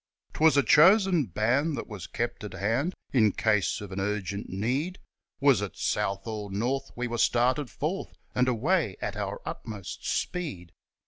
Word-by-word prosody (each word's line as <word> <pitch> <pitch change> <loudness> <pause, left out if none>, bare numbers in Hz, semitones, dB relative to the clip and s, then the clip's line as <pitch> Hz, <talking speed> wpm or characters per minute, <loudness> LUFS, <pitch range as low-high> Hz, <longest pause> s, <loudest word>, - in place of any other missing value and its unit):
'Twas 155 -1 +4
a 140 - +5
chosen 180 - +5
band 125 - +1
that - - -4
was 105 -5 -8
kept 120 -1 -3
at 105 - -6
hand 125 - 0 0.2
In 110 -5 +5
case 105 -4 +1
of 100 -2 -8
an 95 - -4
urgent 100 0 -3
need, 130 - -1 0.4
Was 135 -7 +4
it 105 - -5
south 95 0 -1
or 105 -3 -5
north 125 +7 -1
we 125 - -2
were 120 -1 -3
started 125 +4 +2
forth, 165 +7 -4 0.2
And 125 0 +2
away 130 - +1
at 100 -1 -3
our 100 -1 -3
utmost 105 -5 -6
speed. 90 - -3
115 Hz, 160 wpm, -28 LUFS, 100-145 Hz, 0.4 s, a